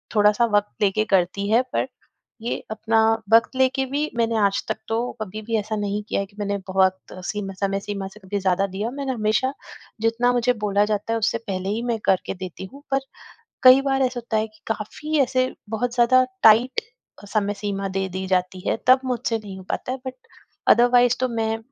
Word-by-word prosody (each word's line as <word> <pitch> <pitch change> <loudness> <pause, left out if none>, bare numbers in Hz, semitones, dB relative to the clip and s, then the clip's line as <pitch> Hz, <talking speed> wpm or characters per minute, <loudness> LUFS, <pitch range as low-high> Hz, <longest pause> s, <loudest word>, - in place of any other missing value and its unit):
थोड़ा-सा 210 +2 +4
वक़्त 205 0 +1
लेके 210 +2 +2
करती 190 +3 0
है, 230 +3 +5
पर - - 0 0.5
ये 235 - -2
अपना" 220 +1 +1 0.3
वक़्त 230 +3 +5
लेके 265 0 +2
भी 295 +3 -1
मैंने 230 -1 +1
आज 200 0 0
तक - - -2
तो 225 - +1 0.2
कभी 215 +1 -5
भी 230 0 -1
ऐसा 215 +1 -2
नहीं 205 0 -2
किया - - 0
है - - -3
कि 200 - -25
मैंने 200 -1 -1
बहुत 190 0 +3 0.3
सीम 205 -1 -3
समय 195 0 0
सीमा 200 -2 -4
से 210 - -15
कभी 200 +1 -3
ज़्यादा 190 0 +1
दिया। 200 +4 -3
मैंने 275 0 -3
हमेशा, 225 +4 0 0.5
जितना 230 +2 +2
मुझे 245 0 +2
बोला 205 0 +3
जाता 210 +1 -1
है, 230 - 0
उससे 225 +1 +1
पहले 190 -1 -3
ही 220 +3 -1
मैं 230 - +1
करके 190 - +1
देती 185 0 -7
हूँ, 280 +1 -13
पर 270 - +3 0.6
कई 255 +1 +9
बार 270 -1 0
ऐसा 255 -1 -1
होता 230 -2 -2
है 215 - 0
कि 215 0 -25
काफ़ी 300 +8 -3
ऐसे 255 0 +1 0.2
बहुत 235 +2 -2
ज़्यादा 250 +1 +5 0.2
टाइट 235 - +5 0.4
अ, - - -9
समय 205 0 0
सीमा 200 -1 -3
दे 190 0 0
दी 190 +1 -4
जाती 185 0 0
है, - - +1
तब 260 +1 +7
मुझसे 240 -2 -1
नहीं 200 -3 -9
हो 190 - -10
पाता - - -3
है, - - -4
बट 260 - -5 0.6
अदरवाइज़ 245 +1 +4
तो 255 - +2
मैं 225 -1 -1
220 Hz, 205 wpm, -23 LUFS, 200-245 Hz, 0.6 s, कई